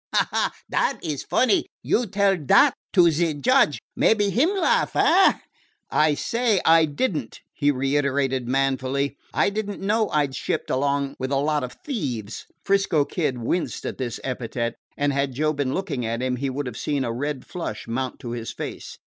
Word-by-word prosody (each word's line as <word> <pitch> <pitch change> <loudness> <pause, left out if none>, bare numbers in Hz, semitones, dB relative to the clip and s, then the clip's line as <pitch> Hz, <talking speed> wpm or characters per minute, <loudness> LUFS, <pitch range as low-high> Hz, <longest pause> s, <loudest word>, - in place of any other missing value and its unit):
"Ha, - - +3
ha! - - +1 0.2
Dat 270 - 0
is 150 -4 -3
funny. 230 -4 +2 0.2
You 240 0 +1
tell 200 0 +2
dat 185 - +4 0.2
to 175 -4 +6
ze 160 0 0
judge; 255 - +3 0.2
mebbe 205 -2 +3
him 275 - +3
laugh, 395 -1 +1
eh?" 385 - +5 0.6
"I 150 -1 +3
say 230 +2 +1
I 165 0 +6
did 160 - -1
n't," 130 -7 -5
he 145 -2 +1
reiterated 135 -2 0
manfully. 135 +1 0 0.2
"I - - +2
did 210 0 -3
n't 205 - -6
know 210 +2 +1
I 150 -1 +2
'd 135 - -8
shipped - - -3
along 140 +1 0
with 130 +1 -3
a - - +2
lot 150 +1 +1
of 125 - -5
thieves." 125 - -4 0.2
'Frisco 195 -7 +2
Kid 150 -7 -2
winced 120 +9 -2
at - - -5
this 120 -3 -3
epithet, 120 -2 -3 0.2
and 145 0 +1
had 140 -1 0
Joe 155 +3 +1
been 140 -3 -1
looking 160 -10 -3
at 115 +2 -2
him 130 -1 -1
he 135 +2 -2
would 140 +2 -3
have 125 -2 -6
seen 145 -2 -1
a 115 - -2
red 140 +2 -3
flush 135 -12 -6
mount 130 +2 -3
to 120 - -6
his 115 -1 -4
face. - - -7
145 Hz, 190 wpm, -24 LUFS, 130-185 Hz, 0.6 s, to